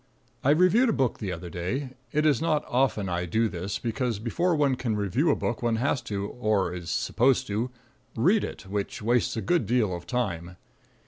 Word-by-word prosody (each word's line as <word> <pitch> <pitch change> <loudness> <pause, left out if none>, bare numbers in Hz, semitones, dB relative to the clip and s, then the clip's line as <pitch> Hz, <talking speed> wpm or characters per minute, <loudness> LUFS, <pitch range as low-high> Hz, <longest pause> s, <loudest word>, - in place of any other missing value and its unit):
I 135 - +3
reviewed 185 - +5
a - - +2
book 130 -3 0
the 100 -3 -3
other 90 -1 -6
day. 120 +11 -3 0.2
It 150 +1 +1
is 145 -5 +3
not 155 -2 +1
often 125 -6 +1
I 90 0 -2
do 110 +7 +2
this, 95 0 -4
because 120 -1 -2
before 165 - 0
one 145 -3 +3
can 125 -4 -1
review 105 - +1
a 145 - +4
book 120 - -2
one 120 -1 +1
has 130 +3 0
to, 100 -1 -2
or 105 -7 0
is 85 -1 -6
supposed 130 +8 +2
to, 110 +4 -2 0.5
read 190 - +3
it, - - -6
which 100 +2 -4
wastes 120 +1 +1
a - - -1
good 175 +4 +1
deal 110 -6 +2
of 85 0 -9
time. 90 -8 -2
115 Hz, 200 wpm, -27 LUFS, 100-140 Hz, 0.5 s, reviewed